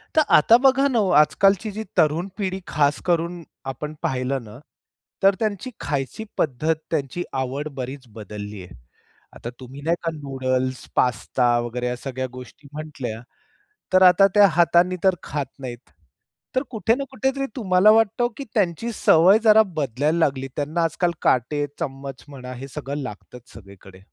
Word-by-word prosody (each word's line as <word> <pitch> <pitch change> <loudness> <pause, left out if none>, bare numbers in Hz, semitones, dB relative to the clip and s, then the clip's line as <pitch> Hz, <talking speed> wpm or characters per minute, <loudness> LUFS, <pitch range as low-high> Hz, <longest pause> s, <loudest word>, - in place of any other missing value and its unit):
तर 310 - +6
आता 225 +10 +6
बघा 270 +1 +4
ना 245 -4 +1
हो 195 -3 +1
आजकालची 195 +6 +2
जी 215 +2 -5
तरुण 160 +2 +2
पिढी 190 -2 -2
खास 145 0 +1
करून 170 0 -1 0.3
आपण 150 +4 -7
पाहिलं 130 -4 -1
ना 110 +3 -12 0.6
तर 195 0 +5
त्यांची 215 +2 -2
खायची 140 +8 -3
पद्धत 155 +3 0 0.2
त्यांची 155 +3 -2
आवड 135 +3 -3
बरीच 130 0 -7
बदलली 105 -2 -8
आहे. 90 - -13 0.6
आता 120 - -7
तुम्ही 130 +2 -10
नाही 165 +3 +1
का 165 - -1
नूडल्स, 130 -3 -2
पास्ता 120 0 +1
वगैरे 120 +1 -4
ह्या 125 - -2
सगळ्या 130 0 -4
गोष्टी 125 +3 -12
म्हटल्या 145 -7 -6 0.7
तर 185 - +6
आता 185 +2 +7
त्या 205 -1 +8
हातानी 175 +2 +3
तर 190 -2 +4
खात 145 -1 -3
नाहीत. 125 -2 -8 0.7
तर 260 - +2
कुठे 225 +1 +1
ना 275 - -3
कुठे 265 0 0
तरी 275 0 -1
तुम्हाला 200 -2 +4
वाटतं, 225 +2 +3
की 280 - -5
त्यांची 205 +3 0
सवय 185 +3 +5
जरा 220 0 +7
बदलायला 145 +2 0
लागली. 135 -4 0
त्यांना 155 +4 -1
आजकाल 170 +2 0
काटे 145 +4 +1
चम्मच 135 -3 -6
म्हणा 130 -3 -9
हे 130 +2 -8
सगळं 145 +1 -5
लागतच 120 +1 -10
सगळीकडे. 95 -3 -14
150 Hz, 155 wpm, -23 LUFS, 130-185 Hz, 0.7 s, त्या